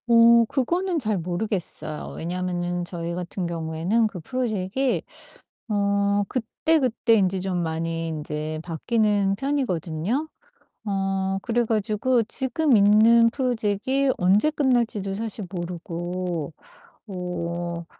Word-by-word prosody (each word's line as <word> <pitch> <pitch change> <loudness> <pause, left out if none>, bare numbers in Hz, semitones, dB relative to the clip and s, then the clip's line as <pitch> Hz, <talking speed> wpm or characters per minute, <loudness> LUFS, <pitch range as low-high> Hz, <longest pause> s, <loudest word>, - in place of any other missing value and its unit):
어 235 0 +7
그거는 340 +9 0
잘 215 -6 0
모르겠어요. 175 -3 -3
왜냐면은 175 0 -2
저희 170 -1 -5
같은 180 +1 -4
경우에는 170 +6 0
그 195 -4 -7
프로젝이 235 +4 -1 0.7
어 200 0 +2
그때그때 255 -1 +1
인제 190 -2 +2
좀 185 -1 -1
많이 165 0 -2
인제 155 0 -4
바뀌는 200 +3 +1
편이거든요. 230 - -1 0.6
어 195 -1 -1
그래 240 +2 0
가지고 225 +3 +1
지금 260 +4 +1
있는 220 +3 +6
프로젝이 255 +2 0
언제 195 +11 +3
끝날지도 240 -9 +1
사실 215 0 -4
모르고 175 -2 -4 0.6
어 175 -2 -4
200 Hz, 245 characters per minute, -24 LUFS, 175-235 Hz, 0.7 s, 어